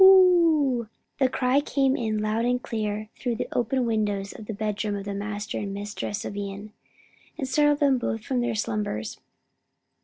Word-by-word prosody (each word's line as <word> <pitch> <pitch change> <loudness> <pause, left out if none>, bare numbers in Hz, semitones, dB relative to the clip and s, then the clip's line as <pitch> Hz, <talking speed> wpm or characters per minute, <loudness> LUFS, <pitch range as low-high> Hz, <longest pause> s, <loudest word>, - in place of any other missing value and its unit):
hoo!" 335 -10 +6 0.3
the 265 -2 +4
cry 260 +2 +2
came 270 -2 +2
in 220 -4 -1
loud 215 +2 0
and 245 +1 +1
clear 215 -1 -3
through 240 -1 -2
the - - -3
open 245 +2 +1
windows 205 -3 -1
of 215 - -10
the 225 - -3
bedroom 210 0 -2
of 200 0 -5
the 200 - -3
master 205 +1 -4
and 200 -1 -4
mistress 205 +1 -4
of - - -5
Ion, 205 +1 -6 0.6
and 265 - -2
startled 295 +2 +3
them 275 -3 +4
both 225 -2 -2
from 255 -2 0
their 240 -2 0
slumbers. 205 - -2
220 Hz, 175 wpm, -26 LUFS, 205-260 Hz, 0.6 s, hoo